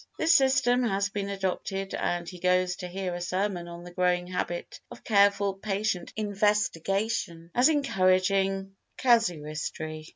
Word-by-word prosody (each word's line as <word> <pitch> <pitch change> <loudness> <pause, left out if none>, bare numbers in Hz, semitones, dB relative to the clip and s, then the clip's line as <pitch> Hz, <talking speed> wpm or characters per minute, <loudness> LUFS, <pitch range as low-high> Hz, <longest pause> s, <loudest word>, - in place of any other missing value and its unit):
This 325 +1 +4
system 260 -3 +3
had 200 -4 +1
been 200 -1 -3
adopted 195 0 -3
and 175 -1 -2
he 180 - -8
goes 180 0 +2
to 180 - -6
hear 185 0 -4
a 175 - -5
sermon 185 0 -2
On 170 0 -9
the 175 - -10
Growing 180 0 +1
Habit 175 -1 -4
of - - -12
Careful 200 -1 +3
Patient 195 -2 -2
Investigation 205 -3 -1
as 250 +5 +5
Encouraging 195 -7 +1 0.2
Casuistry. 155 - 0
195 Hz, 135 wpm, -27 LUFS, 175-205 Hz, 0.2 s, as